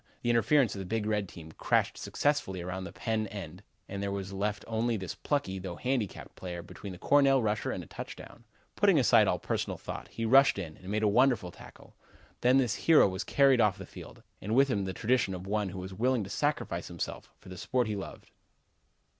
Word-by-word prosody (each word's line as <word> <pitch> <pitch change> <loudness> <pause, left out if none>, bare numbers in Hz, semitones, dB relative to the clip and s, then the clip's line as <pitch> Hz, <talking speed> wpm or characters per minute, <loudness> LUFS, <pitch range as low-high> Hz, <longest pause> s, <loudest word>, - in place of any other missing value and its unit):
The 120 - +2
interference 120 0 +3
of 100 - -6
the 95 - -5
big 110 +3 -2
red 105 -3 -1
team 80 -2 -11
crashed - - +1
successfully 145 -11 -1
around 90 +2 -5
the - - -7
Penn' 110 -2 -2
end 95 -3 -8 0.3
and 100 0 -5
there 100 0 -2
was 100 -1 -4
left 105 +2 -2
only 115 +1 0
this 95 -3 -5
plucky, 95 -10 -2
though 90 -2 -6
handicapped 125 -3 -3
player, 85 -2 -6
between 100 - -9
the 90 - -8
Cornell 140 +4 +4
runner 110 -3 -1
and - - -3
a - - -12
touchdown. - - -9 0.3
Putting - - +4
aside - - +5
all - - +2
personal - - -3
thought, - - -7
he 115 - -4
rushed 135 +2 +6
in 80 -6 -5
and 95 - -11
made 105 +1 0
a - - +4
wonderful 120 -4 +3
tackle. - - -15 0.5
Then 125 +2 +5
this 125 -5 +2 0.2
hero 160 -9 +8
was 95 +1 -3
carried 135 -3 +4
off 105 -4 +3
the - - -8
field, - - -12 0.2
and 105 +4 -2
with 135 +1 +5
him 100 -6 0
the 95 - -3
tradition 115 -4 +1
of 90 +1 -8
one 105 0 -1
who 95 - -8
was 95 +1 -6
willing 120 +3 +1
to 95 - -8
sacrifice - - -1
himself - - -6
for 95 - -15
the 90 - -8
sport 125 -1 0
he 110 -1 -2
loved. 100 - -8
105 Hz, 215 wpm, -30 LUFS, 95-125 Hz, 0.5 s, hero